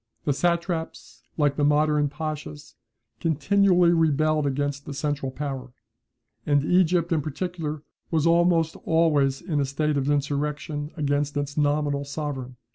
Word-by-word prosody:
The 145 Hz, -, +2 dB
satraps, 170 Hz, -, -2 dB, 0.2 s
like 145 Hz, -2 st, +2 dB
the 145 Hz, -, +1 dB
modern 150 Hz, 0 st, +3 dB
pachas, 150 Hz, -, -6 dB, 0.5 s
continually 180 Hz, +3 st, +3 dB
rebelled 155 Hz, -2 st, +2 dB
against 140 Hz, +1 st, -2 dB
the 145 Hz, -, -5 dB
central 145 Hz, -2 st, -2 dB
power, 130 Hz, -2 st, -5 dB, 0.7 s
and 145 Hz, +1 st, +2 dB
Egypt, 175 Hz, -1 st, +2 dB
in 160 Hz, -2 st, +2 dB
particular, 155 Hz, 0 st, -4 dB, 0.3 s
was 160 Hz, -2 st, +1 dB
almost 170 Hz, -1 st, +3 dB
always 150 Hz, -5 st, +2 dB
in 155 Hz, -5 st, -1 dB
a 140 Hz, -, +1 dB
state 150 Hz, +2 st, -1 dB
of 140 Hz, +1 st, 0 dB
insurrection 145 Hz, +1 st, -2 dB
against 145 Hz, 0 st, 0 dB
its 145 Hz, 0 st, -3 dB
nominal 145 Hz, -1 st, +1 dB
sovereign. 140 Hz, -3 st, -5 dB
150 Hz, 130 wpm, -25 LUFS, 140-160 Hz, 0.7 s, modern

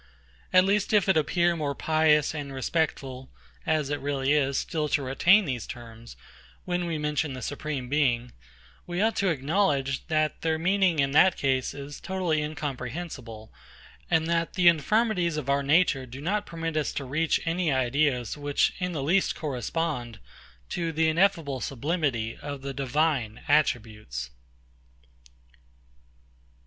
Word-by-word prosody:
At 185 Hz, 0 st, +6 dB
least 205 Hz, +2 st, +1 dB
if 205 Hz, -3 st, +4 dB
it 190 Hz, -, +4 dB
appear 170 Hz, +2 st, +2 dB
more 145 Hz, -3 st, -2 dB
pious 155 Hz, -1 st, +3 dB
and 145 Hz, -3 st, -5 dB
respectful 135 Hz, -2 st, -2 dB, 0.4 s
(as 155 Hz, -3 st, +1 dB
it 145 Hz, -, -1 dB
really 140 Hz, 0 st, 0 dB
is) 140 Hz, -2 st, +1 dB
still 155 Hz, -2 st, -2 dB
to 145 Hz, -, +1 dB
retain 175 Hz, +10 st, +4 dB
these 125 Hz, -6 st, -4 dB
terms, 115 Hz, -1 st, -10 dB, 0.5 s
when 175 Hz, -1 st, -1 dB
we 165 Hz, -2 st, -2 dB
mention 150 Hz, -1 st, -1 dB
the 130 Hz, -, -7 dB
Supreme 145 Hz, -3 st, -4 dB
Being, 125 Hz, -4 st, +1 dB, 0.6 s
we 175 Hz, 0 st, -3 dB
ought 220 Hz, +2 st, +2 dB
to 195 Hz, -, +2 dB
acknowledge, 140 Hz, -3 st, 0 dB
that 155 Hz, -2 st, 0 dB
their 160 Hz, -1 st, 0 dB
meaning, 185 Hz, 0 st, +2 dB
in 135 Hz, -1 st, +2 dB
that 180 Hz, +6 st, +5 dB
case, 130 Hz, -2 st, 0 dB
is 140 Hz, 0 st, -8 dB
totally 180 Hz, -5 st, -1 dB
incomprehensible; 135 Hz, -5 st, -6 dB, 0.6 s
and 160 Hz, -2 st, +2 dB
that 165 Hz, 0 st, 0 dB
the 180 Hz, -2 st, +4 dB
infirmities 175 Hz, 0 st, +2 dB
of 140 Hz, -2 st, -1 dB
our 140 Hz, 0 st, +2 dB
nature 140 Hz, -2 st, +2 dB
do 130 Hz, +2 st, -9 dB
not 205 Hz, +7 st, -1 dB
permit 165 Hz, -1 st, -4 dB
us 155 Hz, -1 st, 0 dB
to 140 Hz, -, -4 dB
reach 155 Hz, +5 st, +1 dB
any 170 Hz, -1 st, 0 dB
ideas 130 Hz, -1 st, +1 dB
which 145 Hz, -1 st, +1 dB
in 180 Hz, -1 st, -2 dB
the 145 Hz, -4 st, -3 dB
least 180 Hz, +7 st, +2 dB
correspond 130 Hz, -3 st, -3 dB, 0.5 s
to 170 Hz, -2 st, -2 dB
the 160 Hz, 0 st, +2 dB
ineffable 165 Hz, -6 st, +1 dB
sublimity 135 Hz, -5 st, -1 dB
of 140 Hz, -2 st, -7 dB
the 140 Hz, 0 st, -4 dB
Divine 135 Hz, -4 st, 0 dB
attributes. 110 Hz, -, 0 dB
150 Hz, 145 wpm, -27 LUFS, 135-170 Hz, 0.6 s, At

